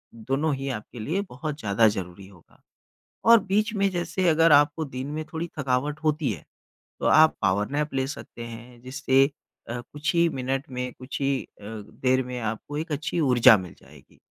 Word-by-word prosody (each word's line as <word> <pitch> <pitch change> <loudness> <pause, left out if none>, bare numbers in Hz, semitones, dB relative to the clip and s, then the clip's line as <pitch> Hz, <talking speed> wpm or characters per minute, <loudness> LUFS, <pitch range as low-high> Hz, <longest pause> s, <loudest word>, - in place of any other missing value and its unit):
दोनों 135 +7 -1
ही 135 +1 -4
आपके 120 -1 -6
लिए 160 - -1
बहुत 150 +3 -5
ज़्यादा 105 -1 +3
ज़रूरी 95 -2 -4
होगा। 95 -4 -21 0.6
और 230 0 +8
बीच 210 +3 +1
में 200 -1 +2
जैसे 175 +1 -1
अगर 165 0 +4
आपको 145 +2 +4
दिन 130 -1 -6
में 155 +1 -3
थोड़ी 165 +1 -3
थकावट 140 +3 -1
होती 155 -3 +1
है 85 -8 -7 0.6
तो - - -1
आप 155 0 +6
पावर 100 +1 +1
नैप 145 0 -2
ले 130 0 0
सकते 135 -4 -8
हैं 120 +1 -10
जिससे 130 +1 +2 0.5
अ, 120 +1 -3
कुछ 150 +6 -3
ही 170 0 +4
मिनट 135 -2 -2
में 125 0 -4
कुछ 130 +3 -7
ही 135 -1 0 0.2
अ, - - -11
देर 115 +5 -1
में 125 0 -5
आपको 115 +6 -4
एक 160 0 -4
अच्छी 155 +4 -2
ऊर्जा 125 -6 +7
मिल 90 -3 -8
जाएगी। - - -19
135 Hz, 185 wpm, -25 LUFS, 120-155 Hz, 0.6 s, और